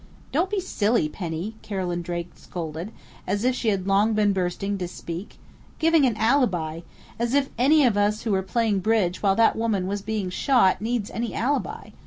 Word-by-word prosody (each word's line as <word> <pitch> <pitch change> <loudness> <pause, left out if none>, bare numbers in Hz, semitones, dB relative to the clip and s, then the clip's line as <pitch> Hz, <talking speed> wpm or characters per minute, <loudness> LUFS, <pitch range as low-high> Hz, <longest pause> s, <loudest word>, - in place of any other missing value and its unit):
"Don't 340 +7 +1
be 410 0 0
silly, 230 - +1
Penny!" 175 +6 -5
Carolyn 180 -4 -3
Drake 175 0 -4
scolded, 165 +3 -6 0.4
as 200 +3 -1
if 255 +1 +3
she 245 - -3
had 195 -3 +1
long 200 +3 +3
been 210 -1 +3
bursting 190 +2 -1
to 180 - -2
speak. 170 +2 -7 0.4
"Giving 325 -3 +4
an 225 -3 -1
alibi! 220 - +1 0.4
As 235 +3 0
if 280 -1 +2
any 285 +5 +4
of 235 -4 +3
us 205 +1 +1
who 225 - -1
were 190 -1 +2
playing 210 +1 0
bridge 190 -3 +1
while 195 -2 +3
that 230 +1 +4
woman 220 -5 0
was 200 +2 -2
being 210 -3 -3
shot 195 -2 +3
needs 230 -1 -2
any 230 0 -3
alibi!... 280 +5 -2
205 Hz, 185 wpm, -24 LUFS, 185-235 Hz, 0.4 s, Giving